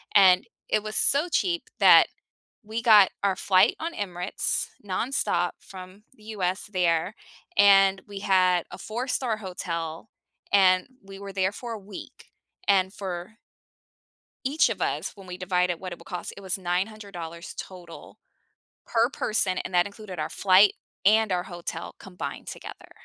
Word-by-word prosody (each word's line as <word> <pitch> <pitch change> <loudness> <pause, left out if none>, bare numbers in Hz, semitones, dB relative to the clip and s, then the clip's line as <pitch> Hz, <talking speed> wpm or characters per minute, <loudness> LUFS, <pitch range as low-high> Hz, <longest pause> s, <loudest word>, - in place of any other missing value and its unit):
and 185 -2 +6 0.2
it 215 - +1
was 215 0 -5
so 290 +5 +3
cheap 345 0 0 0.2
that - - +8 0.6
we 220 +2 -5
got 210 -4 +7
our 195 -2 +2
flight 185 0 +4
on 335 +1 -4
Emirates 180 -2 -2 0.2
nonstop 185 -3 0
from 185 +2 -12
the 215 - -20
US 185 0 -1
there, 180 -1 0 0.4
and 195 -1 +6
we 200 -1 -7
had 185 -3 +3
a - - -8
four-star 235 +2 -2
hotel, 170 -3 -5 0.4
and 185 -2 +5 0.2
we 195 0 -11
were 200 0 -8
there 190 0 0
for 235 +2 -7
a 225 - -5
week, 200 -1 -12 0.4
and 190 -1 +3
for 190 +1 -6 1.1
each 290 +4 +3
of - - -4
us, - - -2
when 195 -2 -14
we 180 0 -7
divide 180 -1 +1
it 170 - -3
what 185 - -6
it 175 - -8
would - - -15
cost, 180 - -6
it 200 - -11
was 190 0 -2
$900 180 -2 -4
total, 175 -3 -10 0.7
per 230 0 +2
person, 215 -7 -1
and - - -5
that 175 0 +3
included 200 -3 -9
our 155 - -2
flight 195 +1 +5 0.3
and 215 0 +4
our 180 -1 0
hotel 175 -2 -7
combined 180 -2 -7
together. - - -10
190 Hz, 155 wpm, -26 LUFS, 180-210 Hz, 1.1 s, that